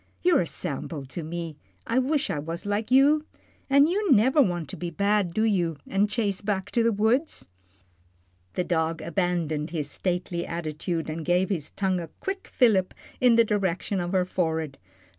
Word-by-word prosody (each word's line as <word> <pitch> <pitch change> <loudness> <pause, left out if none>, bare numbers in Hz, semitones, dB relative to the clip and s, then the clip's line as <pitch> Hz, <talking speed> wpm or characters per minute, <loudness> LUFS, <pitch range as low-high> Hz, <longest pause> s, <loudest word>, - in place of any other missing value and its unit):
You're 350 -3 +4
a 170 - -2
sample 150 -3 -5
to 135 +6 -6
me; 165 -1 -5 0.3
I 235 +3 +1
wish 285 +3 0
I 150 - -2
was 165 +5 -5
like 205 +2 -1
you. 285 +4 +5 0.5
An' 280 +1 +6
you 380 +2 +1
never 260 +5 +5
want 175 - 0
to - - -6
be 175 - -4
bad, 200 +2 +1
do 215 +6 0
you, 175 -8 +1
an' 195 +2 +1
chase 210 -3 -1
back 200 -2 -2
to 235 - +2
the 230 0 +3
woods?" 225 +9 0 1.1
The 180 - +1
dog 165 -2 -1
abandoned 170 -3 -1
his 150 -3 -3
stately 180 -1 -2
attitude, 165 0 -3
and 160 +1 -4
gave 180 +3 +2
his 160 -6 -2
tongue 190 -2 -1
a 170 - -5
quick 390 0 -4
fillip 205 -7 +2 0.2
in 245 -2 +5
the 230 - +6
direction 195 -2 -1
of 175 0 -2
her 185 -1 +3
forehead. 160 -5 -2
185 Hz, 180 wpm, -26 LUFS, 165-225 Hz, 1.1 s, An